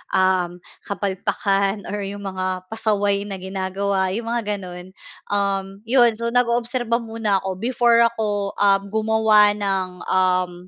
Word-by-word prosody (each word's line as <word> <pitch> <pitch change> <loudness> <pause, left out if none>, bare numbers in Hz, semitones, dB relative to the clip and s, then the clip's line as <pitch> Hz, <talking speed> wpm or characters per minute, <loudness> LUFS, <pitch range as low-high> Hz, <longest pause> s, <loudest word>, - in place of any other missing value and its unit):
uhm, 185 -2 +1 0.3
kapalpakan 200 0 -1
or 205 - -3
yung 200 0 -7
mga 185 -1 -3
pasaway 205 -2 0
na 200 - -5
ginagawa, 190 +1 -1
yung 230 +1 -4
mga 215 -3 -1
gano'n. 180 -1 -9 0.4
Uhm, 195 0 -1
yon 240 -2 +4
so, 235 0 -1
nag-oobserba 240 0 +1
muna 225 -3 -1
ako 190 -1 -3
before 235 0 +3
ako, 210 -3 -2
uhm, 200 -1 +3
gumawa 220 -1 +4
ng, 195 -2 -1 0.2
uhm, 185 -1 +2
200 Hz, 130 wpm, -22 LUFS, 190-220 Hz, 0.4 s, yon